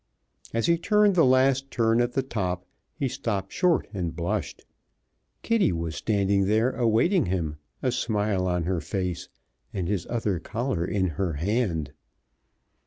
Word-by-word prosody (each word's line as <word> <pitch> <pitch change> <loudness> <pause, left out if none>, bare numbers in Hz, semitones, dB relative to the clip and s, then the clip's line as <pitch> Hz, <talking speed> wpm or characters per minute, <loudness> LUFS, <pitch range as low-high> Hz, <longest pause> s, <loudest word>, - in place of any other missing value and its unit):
As 115 - 0
he 170 0 +3
turned 210 +2 +4
the 170 -3 +4
last 130 +1 +3
turn 115 -1 +2
at 120 0 0
the 135 - +1
top 90 -8 -3 0.3
he 140 - -1
stopped 115 -7 -3
short 180 -3 +2
and 85 -4 -3
blushed. 90 +6 -3 0.8
Kitty 230 - +3
was 85 -1 -3
standing 100 -2 +1
there 110 +5 +2
awaiting 120 - +2
him, 85 -5 -2 0.3
a 130 - +2
smile 105 -5 0
on 90 -1 0
her 90 0 -1
face 90 -4 -3 0.4
and 90 -3 -3
his 95 -3 -2
other 110 -7 -1
collar 115 0 -2
in 95 0 0 0.2
her 90 -4 0
hand. 85 - -1
105 Hz, 150 wpm, -26 LUFS, 90-130 Hz, 0.8 s, turned